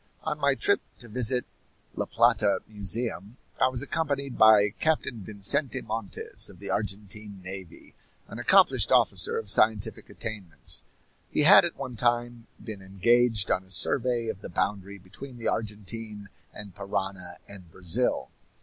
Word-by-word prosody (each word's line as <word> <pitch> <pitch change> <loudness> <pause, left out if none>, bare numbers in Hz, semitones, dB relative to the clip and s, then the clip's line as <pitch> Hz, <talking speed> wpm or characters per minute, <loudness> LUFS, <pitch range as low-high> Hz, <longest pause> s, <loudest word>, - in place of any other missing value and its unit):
On - - -3
my - - +2
trip 405 -1 +2 0.2
to 120 - -13
visit 125 +2 +2 0.5
La - - -2
Plata 115 -3 +2
Museum 105 +1 -2 0.2
I - - +6
was 130 0 -3
accompanied 140 -4 -3
by 105 -2 +6
Captain 155 -7 -1
Vicente 110 +7 +1
Montes, 110 -3 0
of - - -15
the 100 +1 -5
Argentine 105 0 -4
Navy, 95 -2 -10 0.3
an - - -9
accomplished - - +4
officer - - +3
of - - -5
scientific 110 0 +2
attainments. 95 -10 -5 0.5
He - - 0
had 175 +3 +8
at 170 - -3
one 130 -4 -7
time 120 0 -1 0.2
been 110 -3 -8
engaged 105 +2 +1
on 95 - 0
a 95 - -23
survey 120 +5 +2
of 105 -3 -5
the - - -8
boundary 100 +2 -3
between 115 +8 -12
the 115 - -2
Argentine 105 -1 -5 0.2
and 100 -3 -9
Parana 95 -3 -5
and 95 -4 -12
Brazil. 95 +9 -1
110 Hz, 145 wpm, -27 LUFS, 100-120 Hz, 0.5 s, had